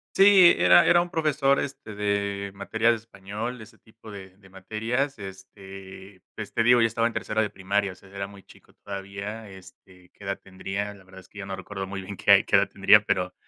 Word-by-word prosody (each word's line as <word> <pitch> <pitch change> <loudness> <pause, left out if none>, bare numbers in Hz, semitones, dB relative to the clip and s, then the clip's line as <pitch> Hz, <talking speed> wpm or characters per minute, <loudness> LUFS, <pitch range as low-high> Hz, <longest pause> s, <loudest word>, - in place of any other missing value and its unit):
Sí, 195 -3 +7
era 90 0 +6
era 175 - +5
un 175 - -4
profesor, 150 -5 +1
este, 130 -6 -7
de 100 -1 -2
materias 110 +4 +1
de 115 - 0
español, 110 +2 -7
ese 110 - -14
tipo 110 0 -15
de 95 -2 -11
de 95 -1 -20
materias. 110 +8 -3
Este, 95 -1 -11
pues, 105 -2 -7
te 115 - +1
digo, 120 +1 +5
ya 115 - +4
estaba 115 +1 0
en 120 - -6
tercero 110 +1 -1
de 105 - -1
primaria, 100 0 -2
o - - -18
sea, 95 - -19
era 100 0 -5
muy 100 -1 -15
chico - - -20
todavía, 100 +2 -7
este, 95 -1 -16
¿qué 100 - -14
edad 100 0 -2
tendría?, 95 +2 -5
la 95 -2 -18
verdad 95 0 -14
es - - -22
que 105 - -17
yo 95 - -6
no 95 0 -5
recuerdo 95 0 -7
muy 100 0 -6
bien 95 +1 -8
qué - - +2
hay - - +7
qué - - +3
edad - - +2
tendría, 100 +2 +5
pero 90 -1 -1
100 Hz, 225 wpm, -25 LUFS, 95-110 Hz, -, Sí